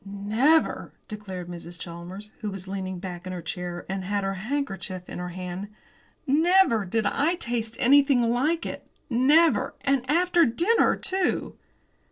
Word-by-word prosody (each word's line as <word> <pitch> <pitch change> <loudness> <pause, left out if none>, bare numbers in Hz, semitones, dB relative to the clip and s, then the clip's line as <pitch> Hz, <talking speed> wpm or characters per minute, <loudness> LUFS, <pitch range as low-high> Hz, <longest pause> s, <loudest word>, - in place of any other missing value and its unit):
"Never," 215 +11 +1
declared 190 -5 -7
Mrs. 175 0 -8
Chalmers, 180 +5 -8
who 215 - -3
was 195 -1 -5
leaning 190 -1 -4
back 180 0 -7
in 185 - -4
her 180 - -5
chair, 175 +1 -5
and 190 0 -3
had 200 +1 -1
her 195 0 -1
handkerchief 195 -5 -4
in - - -7
her 180 0 -4
hand, 180 +2 -6 0.6
"never 315 - +4
did 220 +4 -1
I 300 +10 +1
taste 235 -7 -3
anything 275 -1 +5
like 265 +9 +1
it! - - -6 0.2
Never! 295 +8 +4
and 275 -2 +1
after 350 +2 +4
dinner, 340 - +3
too!" 375 -1 -1
210 Hz, 150 wpm, -26 LUFS, 185-285 Hz, 0.6 s, anything